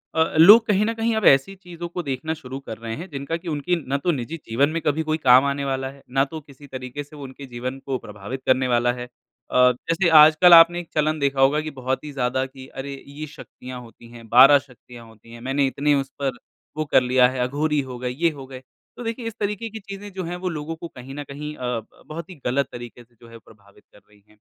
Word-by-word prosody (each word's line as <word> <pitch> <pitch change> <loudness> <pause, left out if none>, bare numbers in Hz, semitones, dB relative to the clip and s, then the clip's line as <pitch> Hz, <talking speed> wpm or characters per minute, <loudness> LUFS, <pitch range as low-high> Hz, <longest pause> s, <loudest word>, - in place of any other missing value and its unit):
अ, 160 - +4
लोग 210 +8 +9
कहीं 210 0 +2
न 225 - -1
कहीं 225 0 0
अब 220 - -1
ऐसी 135 +9 +4
चीज़ों 175 -2 -9
को 175 +1 -5
देखना 140 +2 -3
शुरू 135 -4 -8
कर 110 -5 -8
रहे 115 0 -6
हैं 175 +7 -8
जिनका 140 +2 -4
कि 170 - -13
उनकी 160 +3 -1
ना 140 - 0
तो 175 +5 0
निजी 145 +2 -4
जीवन 135 +6 +1
में 165 +1 -3
कभी 150 +2 0
कोई 155 - +1
काम 130 -2 +6
आने 140 0 -1
वाला 135 -1 -2
है, 140 0 -17
ना 135 +2 +2
तो 160 +3 -8
किसी 140 0 -16
तरीके 130 +1 -7
से 145 +2 -16
उनके 140 -1 -9
जीवन 130 +1 -6
को 135 -1 -2
प्रभावित 105 +6 -8
करने 130 0 +2
वाला 120 0 +2
है। 125 0 -6 0.5
अ, - - -4 0.2
जैसे 165 +8 0
आजकल 155 +4 +7
आपने 170 +1 +8
एक 175 - -9
चलन 155 0 +1
देखा 140 -1 0
होगा 140 +3 +4
कि 155 0 -6
बहुत 130 0 -3
ही 150 - -7
ज़्यादा 130 -1 -1
कि 130 0 -12
अरे! 140 +1 -7
ये 145 +2 -8
शक्तियाँ 130 -3 -10
होती 115 0 -15
हैं, 115 -1 -13
12 135 +5 +8
शक्तियाँ 120 -2 -15
होती 115 +1 -18
हैं। 120 - -11
मैंने 135 +3 0
इतनी 145 +2 +1
उस 135 -1 -2
पर 135 -3 -2 0.4
वो 155 - -1
कर 145 - +4
लिया 125 0 +4
है, 130 0 -5
अघोरी 150 +3 0
हो 130 -2 -8
गए, 125 0 -3
ये 160 +7 +1
हो 140 -3 -10
गए। 130 -1 -9 0.4
तो - - -7
देखिए 230 +1 -4
इस 225 - -5
तरीके 210 +2 -3
की 220 +1 -8
चीज़ें 200 0 -9
जो 190 0 -4
हैं 175 +1 -4
वो - - +1
लोगों 160 -1 -5
को 170 +1 -8
कहीं 130 -2 -11
न 145 - -5
कहीं 150 +2 -7
अ, - - -14 0.2
ब 110 - -19
बहुत 165 +2 -7
ही 185 - -10
गलत 135 +2 +1
तरीके 120 0 -10
से 120 0 -32
जो 115 - -15
है 115 - -12
प्रभावित 100 -2 -21
कर - - -18
रही 105 -1 -24
हैं। 105 - -24
140 Hz, 250 wpm, -23 LUFS, 125-160 Hz, 0.5 s, लोग